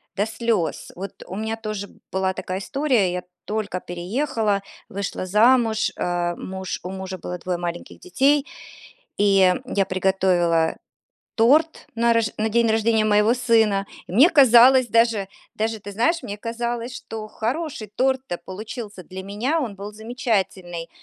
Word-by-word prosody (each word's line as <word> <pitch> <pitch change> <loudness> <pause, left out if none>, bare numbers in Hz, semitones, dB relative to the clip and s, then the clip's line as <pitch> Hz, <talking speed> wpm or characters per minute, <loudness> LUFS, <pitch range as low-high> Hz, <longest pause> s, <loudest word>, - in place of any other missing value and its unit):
до 205 - +1
слёз. 225 -5 -2
Вот 190 +2 -8
у 190 - -8
меня 220 +1 -2
тоже 215 -3 -5 0.2
была 190 0 0
такая 185 +1 -4
история: 250 -6 +1
я 180 0 -3 0.2
только 210 -4 -3
переехала, 205 +4 -1 0.3
вышла 195 -1 -4
замуж, 220 +3 +3
а, 175 -1 -1
муж 190 0 -5
у 180 - -5
мужа 190 0 -6
было 180 -1 -6
2 180 -1 -2
маленьких 175 0 -6
детей, 290 -4 +2 0.7
и 195 -2 +5
я 200 -6 0
приготовила 180 -3 +1 0.6
торт 295 +8 +3
на 235 0 +3
рож 230 -2 +2
на 220 +1 0
день 235 +1 +3
рождения 220 0 +2
моего 210 +2 +4
сына. 225 -5 +2 0.2
И - - -9
мне 270 - +6
казалось 255 -3 +7
даже, 230 -4 +2 0.3
даже 220 0 -1
ты 205 +1 -8
знаешь, 330 - +1
мне 205 0 -5
казалось, 235 +2 -4
что 220 -1 -7
хороший 245 +1 -3
торт-то 260 -7 0
получился 210 0 -8
для 190 +2 -8
меня, 235 +11 -1
он 230 -8 -3
был 200 +2 -7
замечательный. 195 -6 -3
215 Hz, 145 wpm, -23 LUFS, 190-235 Hz, 0.7 s, казалось